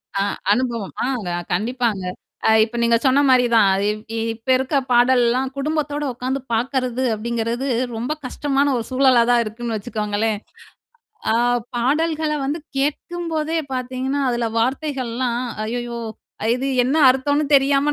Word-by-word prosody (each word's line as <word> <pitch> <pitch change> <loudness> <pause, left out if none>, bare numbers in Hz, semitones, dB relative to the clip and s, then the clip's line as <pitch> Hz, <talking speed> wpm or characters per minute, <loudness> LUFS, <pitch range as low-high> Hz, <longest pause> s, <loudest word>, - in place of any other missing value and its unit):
அ, - - 0 0.3
அனுபவம். 235 -4 -2
ஆங்க, 245 -9 -2 0.2
கண்டிப்பாங்க. 225 0 -1 0.4
அ - - +5
இப்ப 225 +2 -5
நீங்க 235 0 +4
சொன்ன 270 +2 +4
மாரி 255 -1 +5
தான். 205 -3 +6 0.2
இப் 210 0 -3 0.3
இப்ப 225 +3 -12
இருக்க 265 +3 -2 0.2
பாடல்லாம் 245 +1 +3
குடும்பத்தோட 295 0 -1
உட்காந்து 255 +3 -3
பாக்கறது 255 +1 -1
அப்படிங்கிறது, 235 +3 -2 0.3
ரொம்ப 240 +5 -3
கஷ்டமான 280 +2 0
ஒரு 230 - -3
சூழலா 260 -2 +5
தான் 240 -1 +4
இருக்குன்னு 225 +1 -4
வச்சுக்கோங்களேன். 210 -1 -2 0.9
ஆ, - - +2 0.4
பாடல்கள 305 +5 +1
வந்து 290 +4 -1 0.2
கேட்கும்போதே 320 +3 -1 0.2
பாத்தீங்கன்னா, 255 +2 -2
அதுல 240 -1 -1
வார்த்தைகள்லாம், 255 -2 -1 0.2
"ஐய்யய்யோ! 240 +1 -4 0.5
இது 255 +2 -2 0.2
என்ன 260 +5 +1
அர்த்தம்னு 285 +3 +1
தெரியாம 280 +1 +4
255 Hz, 125 wpm, -21 LUFS, 235-275 Hz, 0.9 s, தான்